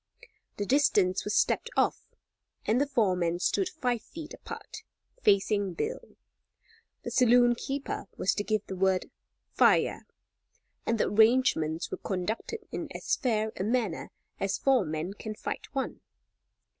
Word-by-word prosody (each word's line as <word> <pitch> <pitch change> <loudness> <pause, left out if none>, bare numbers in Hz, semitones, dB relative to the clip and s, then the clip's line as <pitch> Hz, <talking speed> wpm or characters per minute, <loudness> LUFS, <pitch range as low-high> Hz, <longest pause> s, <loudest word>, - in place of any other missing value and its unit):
The 205 - -1
distance 205 -8 +3
was 210 - -1
stepped 465 - +2
off, - - +2 0.6
and 235 +5 +2
the 285 - +1
four 225 -9 +2
men 170 -1 0
stood 370 - +1
five 250 -9 -1
feet 315 +5 -9
apart, - - -9 0.4
facing 200 - +2
Bill. 460 - -4 0.9
The - - -5
saloon 245 -1 +5
keeper 270 -2 -4
was 195 - +2
to 205 - -2
give 215 -1 -1
the 190 - -6
word 190 0 +1 0.4
"fire," - - +3 0.8
and 230 - +2
the - - +2
arrangements 215 -8 +3
were - - -3
conducted 215 - -4
in - - -4
as - - 0
fair 220 -6 0
a - - -3
manner 220 -5 -1 0.3
as 195 0 0
four 260 -7 +3
men 160 +4 -3
can 215 +1 -7
fight - - -5
one. 270 - -3
215 Hz, 145 wpm, -29 LUFS, 190-255 Hz, 0.9 s, saloon